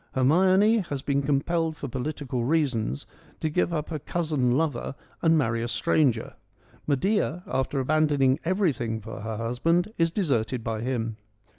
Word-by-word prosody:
Her 130 Hz, -, +1 dB
mione 190 Hz, -, +4 dB
has 140 Hz, -2 st, -4 dB
been 140 Hz, 0 st, +1 dB
compelled 160 Hz, +3 st, 0 dB
for 145 Hz, -, -5 dB
political 130 Hz, -1 st, -3 dB
reasons 125 Hz, -, 0 dB, 0.3 s
to 155 Hz, -, -1 dB
give 175 Hz, +2 st, +1 dB
up 155 Hz, -2 st, -2 dB
her 155 Hz, -3 st, -3 dB
cousin 145 Hz, -6 st, 0 dB
lover 145 Hz, -4 st, -1 dB, 0.3 s
and 165 Hz, -1 st, +4 dB
marry 115 Hz, -5 st, +1 dB
a 120 Hz, -, -2 dB
stranger. 120 Hz, 0 st, +1 dB, 0.5 s
Medea 180 Hz, +3 st, +1 dB
after 135 Hz, +1 st, -1 dB
abandoning 145 Hz, -1 st, +2 dB
everything 155 Hz, -, 0 dB
for 110 Hz, +1 st, -8 dB
her 110 Hz, 0 st, -4 dB
husband 165 Hz, -, 0 dB
is 165 Hz, 0 st, +4 dB
deserted 130 Hz, -, -1 dB
by 110 Hz, -1 st, -3 dB
him. 115 Hz, -3 st, -2 dB
140 Hz, 150 wpm, -26 LUFS, 120-165 Hz, 0.5 s, mione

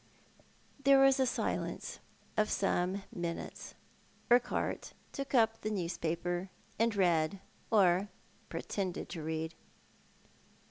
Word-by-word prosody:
Tiierc 270 Hz, 0 st, +7 dB
was 270 Hz, 0 st, +5 dB
a 260 Hz, -, +4 dB
silence -, -, -2 dB, 0.4 s
of 215 Hz, 0 st, +2 dB
some 195 Hz, 0 st, +1 dB
minutes. 170 Hz, -1 st, -5 dB, 0.6 s
Urquhart 245 Hz, 0 st, +2 dB, 0.2 s
took 275 Hz, 0 st, -3 dB
up 225 Hz, -2 st, +4 dB
the 215 Hz, -, -1 dB
newspaper 175 Hz, -2 st, -1 dB
again, 185 Hz, +2 st, -8 dB, 0.3 s
and 230 Hz, -1 st, +3 dB
read, 175 Hz, -1 st, +2 dB, 0.3 s
or 195 Hz, -2 st, +4 dB, 0.4 s
pretended 190 Hz, -3 st, -3 dB
to 170 Hz, -3 st, -5 dB
read. 160 Hz, +1 st, -3 dB
195 Hz, 105 wpm, -33 LUFS, 175-225 Hz, 0.6 s, Tiierc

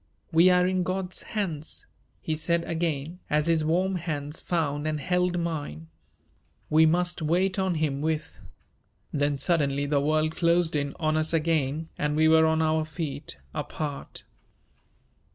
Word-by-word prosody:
"We 170 Hz, +3 st, +6 dB
are 180 Hz, 0 st, +4 dB
in 185 Hz, 0 st, +1 dB
God's 185 Hz, 0 st, -3 dB
hands," 170 Hz, -9 st, -4 dB, 0.4 s
he 160 Hz, -, -2 dB
said 170 Hz, +2 st, 0 dB
again, 165 Hz, 0 st, -2 dB
as 150 Hz, 0 st, +2 dB
his 165 Hz, -2 st, +2 dB
warm 180 Hz, +4 st, +1 dB
hands 150 Hz, -2 st, -4 dB
found 155 Hz, -3 st, -1 dB
and 155 Hz, -1 st, -1 dB
held 180 Hz, +3 st, 0 dB
mine. 145 Hz, -, -4 dB, 0.8 s
"We 160 Hz, +1 st, +6 dB
must 175 Hz, +1 st, +1 dB
wait 185 Hz, +5 st, +1 dB
on 190 Hz, -2 st, +1 dB
Him 150 Hz, -3 st, -1 dB
with 155 Hz, 0 st, -2 dB, 0.4 s
" -, -, -43 dB, 0.3 s
Then 145 Hz, 0 st, +1 dB
suddenly 145 Hz, -2 st, +1 dB
the 145 Hz, -1 st, +1 dB
world 155 Hz, +2 st, +1 dB
closed 170 Hz, -1 st, +2 dB
in 140 Hz, -1 st, -1 dB
on 155 Hz, -1 st, +1 dB
us 155 Hz, +1 st, +1 dB
again 160 Hz, -1 st, 0 dB
and 150 Hz, 0 st, 0 dB
we 160 Hz, +1 st, +4 dB
were 160 Hz, 0 st, +6 dB
on 160 Hz, 0 st, +2 dB
our 155 Hz, 0 st, +2 dB
feet 150 Hz, -, -5 dB, 0.2 s
apart. 145 Hz, -3 st, -5 dB
160 Hz, 150 wpm, -27 LUFS, 150-170 Hz, 0.8 s, We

